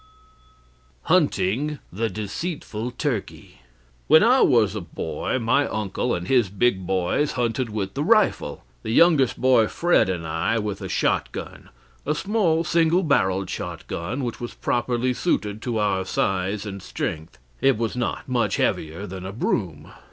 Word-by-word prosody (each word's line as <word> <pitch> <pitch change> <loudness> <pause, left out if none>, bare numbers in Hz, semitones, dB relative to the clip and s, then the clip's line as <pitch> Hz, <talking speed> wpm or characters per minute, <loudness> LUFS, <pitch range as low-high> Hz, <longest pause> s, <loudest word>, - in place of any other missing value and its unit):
HUNTING 145 +11 +1 0.2
THE 115 +4 -1
DECEITFUL 110 - -4
TURKEY 125 - -4 0.5
When - - +7
I - - +5
was - - +4
a - - -4
boy - - -3
my 130 +4 +2
uncle 110 +3 -2
and 90 +1 -5
his 125 -7 +3
big 100 -2 0
boys 95 +10 0
hunted 120 0 -1
with 100 -3 -3
the 140 - -2
rifle, 215 +3 +2 0.2
the - - -6
youngest 140 0 +4
boy 125 -4 +4
Fred 175 - +2
and 85 -3 -3
I 80 +8 0
with 105 -2 -3
a - - -5
shotgun - - -2 0.3
a 150 - -1
small 180 -3 +1
single 170 +2 +2
barrelled 95 - +1
shotgun 115 +12 -4
which 120 -1 -4
was 120 - -6
properly 120 +1 0
suited 110 -8 -1
to 120 -2 -2
our 100 -3 +1
size 95 +2 -1
and 100 -1 -6
strength; 80 -4 -5 0.2
it 135 -4 +4
was 115 +1 -2
not 125 -1 -3
much 120 -6 +1
heavier 80 +6 -1
than 95 -1 -7
a 95 - -5
broom. 90 - -2
115 Hz, 150 wpm, -24 LUFS, 95-135 Hz, 0.5 s, When